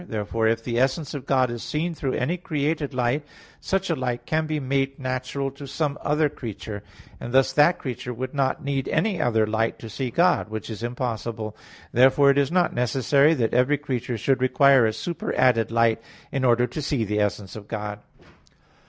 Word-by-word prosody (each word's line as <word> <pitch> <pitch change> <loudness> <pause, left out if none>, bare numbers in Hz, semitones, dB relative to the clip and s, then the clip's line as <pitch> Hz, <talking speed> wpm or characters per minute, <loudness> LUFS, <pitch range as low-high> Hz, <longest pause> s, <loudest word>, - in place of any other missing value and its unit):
Therefore 110 +1 -1
if 115 0 0
the 120 0 -1
essence 135 +3 0
of 140 -3 -6
God 130 -3 +2
is 120 -1 -5
seen 165 +3 -2
through 135 -4 -3
any 150 +8 0
created 155 -4 -2
light, 125 +3 0 0.4
such 195 0 -1
a - - +1
light 125 -3 -3
can 155 0 0
be 155 -1 -1
made 135 0 -1
natural 130 +1 -3
to 140 +1 -10
some 145 +1 -1
other 150 +1 +2
creature; 110 -6 -7 0.4
and 120 - -6
thus, 135 +1 +3
that 150 +6 +5
creature 125 -1 -5
would 130 +2 -5
not 135 -2 0
need 140 -1 -1
any 200 -6 0
other 110 -5 +2
light 110 +1 -1
to 115 - -9
see 130 +3 -3
God; 170 -2 +2
which 110 +1 -5
is 110 - -7
impossible. 115 -3 -4 0.4
Therefore 135 +3 +5
it 140 - +2
is 140 +1 +1
not 180 -1 +2
necessary 140 +5 +3
that 115 -6 0
every 130 +4 +3
creature 125 -4 -3
should 130 +4 +1
require 130 -1 +5
a 110 - -1
superadded 125 -7 +1
light 115 -1 +2 0.3
in 135 -1 -1
order 120 -1 +4
to 125 +6 -5
see 140 -4 0
the 105 0 -1
essence 105 -2 -2
of 105 -2 -9
God. 105 -2 -5
130 Hz, 190 wpm, -24 LUFS, 115-145 Hz, 0.4 s, that